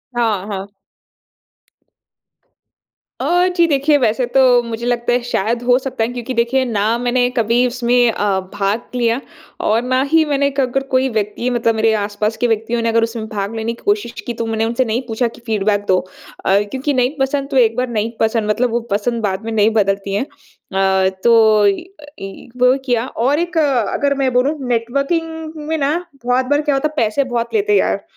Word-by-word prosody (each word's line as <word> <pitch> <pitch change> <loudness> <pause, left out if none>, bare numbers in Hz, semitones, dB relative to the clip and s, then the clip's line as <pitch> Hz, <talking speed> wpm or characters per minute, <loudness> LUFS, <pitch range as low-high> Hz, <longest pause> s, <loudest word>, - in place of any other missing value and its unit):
हाँ, 220 -5 0
हाँ। 200 -1 -6 2.5
अ, 355 +1 +2
जी 340 - +5
देखिए, 290 0 +3
वैसे 250 -1 +1
तो 255 -2 +5
मुझे 230 0 -5
लगता 240 0 0
है 245 - +1
शायद 235 0 -1
हो 245 0 +4
सकता 260 -4 -3
है, 225 - -1
क्योंकि 245 +1 -5
देखिए 240 +3 +1
ना 220 -1 0
मैंने 245 0 +1
कभी 235 +2 +2
उसमें 245 -1 +2
अ, 205 -3 0
भाग 205 +3 -1
लिया 235 0 +1 0.4
और 220 +2 +2
ना 255 +1 0
ही 325 0 +5
मैंने 280 -1 +1
क 275 - -4
अगर 260 +2 -1
कोई 260 +1 +3
व्यक्ति 215 +2 -2
मतलब 235 -2 +1
मेरे 220 0 +2
आस-पास 210 +1 -2
के 245 - +1
व्यक्तियों 225 +1 -1
ने 230 - 0
अगर 230 0 +2
उसमें 230 -1 -3
भाग 205 +1 -4
लेने 225 +1 -2
की 235 - -16
कोशिश 410 - 0 0.2
की, 240 - -2
तो 230 0 -4
मैंने 225 0 -1
उनसे 235 +3 0
नहीं 230 +2 -1
पूछा 235 +1 0
कि 230 - -12
फीडबैक 205 -2 0
दो। 185 -1 +3 0.5
अ, 195 +1 +4
क्योंकि 270 +2 -1
नहीं 255 +2 +1
पसंद 275 +1 -1
तो 270 - +1
एक 225 -3 +4
बार 250 +1 0
नहीं 225 -1 -1
पसंद 220 -1 +1
मतलब 240 +4 +1
वो 235 - +1
पसंद 230 +3 -1
बाद 195 -1 -1
में 225 - -3
नहीं 215 -1 +3
बदलती 195 -2 0
है। 205 - 0
अ, 190 -7 -1
तो 220 -3 +5
इ 200 - 0 0.2
अ, - - -11
इ 195 +3 -9
वो 250 +1 +6
किया 240 -2 +1
और 270 +5 0
एक 345 0 -2
अगर 280 -1 +1
मैं 260 - +1
बोलूँ 260 +5 +2
नेटवर्किंग 310 +6 -2
में 320 0 -1
ना, 285 0 +1 0.3
बहुत 250 +1 +2
बार 290 +3 +1
क्या 295 -2 0
होता 270 +3 +1
है 305 - -12
पैसे 220 +6 +1
बहुत 240 -3 -3
लेते 420 -1 +2
यार - - 0
235 Hz, 200 wpm, -18 LUFS, 220-265 Hz, 2.5 s, वो